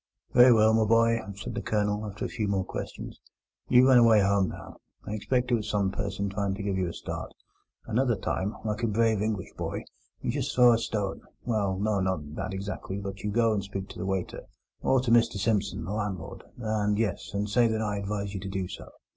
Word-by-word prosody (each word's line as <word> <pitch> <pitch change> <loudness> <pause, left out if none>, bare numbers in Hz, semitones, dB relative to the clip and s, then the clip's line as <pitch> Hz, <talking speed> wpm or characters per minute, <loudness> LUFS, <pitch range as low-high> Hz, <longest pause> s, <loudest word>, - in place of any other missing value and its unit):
"Very 125 0 +8
well, 110 -1 +5
my 110 0 +3
boy," 115 +1 +4 0.2
said 100 - -6
the - - -3
Colonel, 105 0 0
after 105 +1 -5
a - - -1
few 110 -3 -3
more 95 -2 0
questions. - - -7 0.5
"You 125 +1 +6
run 130 -2 +7
away 115 -3 +6
home 100 -1 +2
now. - - -10 0.3
I 105 - -4
expect 125 +4 0
it - - +3
was 110 -3 0
some 100 -2 +1
person 100 0 -3
trying 100 0 -2
to 100 - -6
give 100 -1 -1
you 95 -1 0
a 85 - -5
start. - - -6 0.5
Another 120 +1 +1
time, 100 +1 -2
like 105 +1 -2
a 115 - +1
brave 110 -1 +2
English 105 -3 -2
boy, - - -3 0.4
you - - -2
just 140 +1 -2
throw 125 -1 +7
a 115 - +2
stone—well, 105 -1 -2
no, 105 0 +1
not 80 -6 -2
that - - -4
exactly, 95 0 -5
but 100 0 -6
you 105 - -2
go 115 +1 +2
and 100 -2 -1
speak 100 -1 -6
to - - -10
the 90 - -3
waiter, 95 -2 -2 0.4
or 130 -1 +3
to 125 -2 -1
Mr 115 -3 +4
Simpson, 100 -3 0
the 95 - -5
landlord, 100 -6 -4
and—yes—and 105 -2 -1
say 120 +3 +3
that 110 -1 -1
I 105 -1 -1
advised 100 0 -3
you 95 - -3
to 95 +1 -6
do 95 -1 -2
so." - - -9
105 Hz, 215 wpm, -28 LUFS, 100-115 Hz, 0.5 s, Very